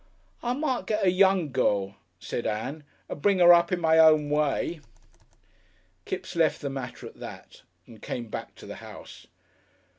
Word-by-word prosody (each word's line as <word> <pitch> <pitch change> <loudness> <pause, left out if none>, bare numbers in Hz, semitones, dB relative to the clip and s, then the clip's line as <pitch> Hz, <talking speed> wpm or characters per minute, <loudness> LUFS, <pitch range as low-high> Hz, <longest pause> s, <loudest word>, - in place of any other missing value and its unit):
"I 240 0 -1
might 270 -2 -2
get 210 -2 0
a 180 - +4
young 185 -4 +3
girl," 100 -6 0 0.2
said 120 - -4
Ann, 135 +8 -4 0.2
"and 145 - -7
bring 195 +2 +3
'er 175 0 +9
up 170 +1 +3
in 180 - 0
my 160 -1 +3
own 155 -2 +5
way." 150 +2 0 1.3
Kipps 185 - -5
left 165 -2 +2
the 140 -2 -3
matter 135 -2 -7
at - - -12
that - - -11 0.2
and 110 -3 -15
came 120 -2 -5
back - - -7
to - - -13
the - - -8
house. - - -12
160 Hz, 170 wpm, -26 LUFS, 135-185 Hz, 1.3 s, er